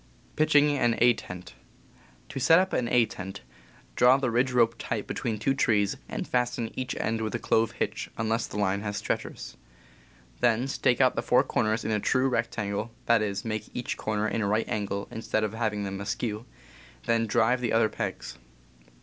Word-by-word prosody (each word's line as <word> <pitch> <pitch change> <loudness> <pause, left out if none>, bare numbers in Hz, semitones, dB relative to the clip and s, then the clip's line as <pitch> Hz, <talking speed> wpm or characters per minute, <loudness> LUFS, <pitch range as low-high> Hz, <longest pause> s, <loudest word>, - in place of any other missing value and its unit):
To 155 +1 +3 1.9
set 165 +5 +5
up 190 +1 +1
an 120 - 0
A 120 -2 +4
tent, 95 -2 -8 0.5
draw 125 +2 +6
the 130 -3 -1
ridge 125 +3 +2
rope 115 -2 +3
tight 110 -3 -3
be - - -4
tween 115 -4 -2
two 135 +6 +1
trees, 105 -7 +2
and - - -4
fasten 120 -2 -1
each 130 -1 -4
end 110 0 -1
with 110 +1 -2
a - - +1
clove 115 -1 +1
hitch, - - -3
p..,. - - -24
unless 115 +1 0
the - - -7
line 100 -1 +1
has 105 -1 -3
stretchers. - - -4 0.8
Then 120 -1 +3
.J,, - - -2
stake 125 - +2
out 130 -1 +4
the - - 0
four 125 - +3
corners 110 0 0
in - - -1
a 105 - +1
true 130 +5 +2
rect 115 -2 -1
angle 105 +1 -2 0.2
(that 115 -1 +4
is, 100 -1 -2
make 110 -1 -3
each 125 - -3
corner 105 0 -1
a 110 - -1
right 105 +1 0
angle, 100 -1 -3
instead 110 -1 -2
of 105 -1 -2
having 110 -2 -1
them 95 0 -4
askew). 110 +2 -3 0.6
Then 115 -1 +1
drive 115 +4 +2
the 120 - -1
other 115 -1 +4
pegs. - - -5
115 Hz, 185 wpm, -27 LUFS, 105-120 Hz, 1.9 s, draw